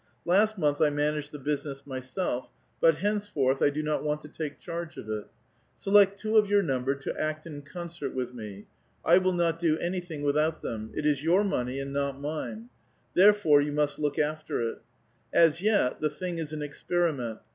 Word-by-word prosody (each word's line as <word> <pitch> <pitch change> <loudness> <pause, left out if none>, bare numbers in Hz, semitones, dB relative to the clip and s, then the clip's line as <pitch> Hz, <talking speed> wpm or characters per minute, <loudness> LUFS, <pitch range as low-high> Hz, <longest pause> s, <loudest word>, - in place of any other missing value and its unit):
Last 210 +5 +3
month 145 -4 +1
I 150 - +5
managed 150 0 -1
the 150 - -7
business 140 -1 -3
myself, 130 +1 -3 0.3
but 165 -1 +5
hencefortli, 195 -9 0
1 - - +5
do 155 +2 -3
not 150 0 -1
want 150 0 -1
to 150 - -10
tjike 150 -1 -5
charge 170 -1 -6
of - - -8
it. 110 -1 -4 0.5
Select 200 0 +5
two 220 +1 +1
of 210 -1 +5
vour 205 -1 +4
numl)er 135 -2 -1
to - - -4
act 155 +1 -2
in 150 -3 -7
concert 170 +2 -6
with 125 -1 -3
me. 105 -4 -8 0.4
I 175 +3 +7
will 185 0 +1
not 170 -1 +1
do 160 -2 +2
anything 175 -4 -4
without 150 +2 +1
tliem. 110 -1 -4
It 150 - -1
is 150 -1 +2
your 175 +5 +4
money, 130 -10 -1
and 135 0 -5
not 140 -1 -1
mine; 160 +10 -5 0.4
therefore, 190 -7 +6
you 145 0 -2
must 150 0 0
look 145 -1 -1
after 155 +1 -1
it. - - -13 0.5
As 165 0 +4
yet, 205 -11 +2
the 155 - +2
thing 170 +3 -5
is 155 -2 -4
an 155 -1 -4
experiment. 145 -6 -1
150 Hz, 190 wpm, -28 LUFS, 140-175 Hz, 0.5 s, I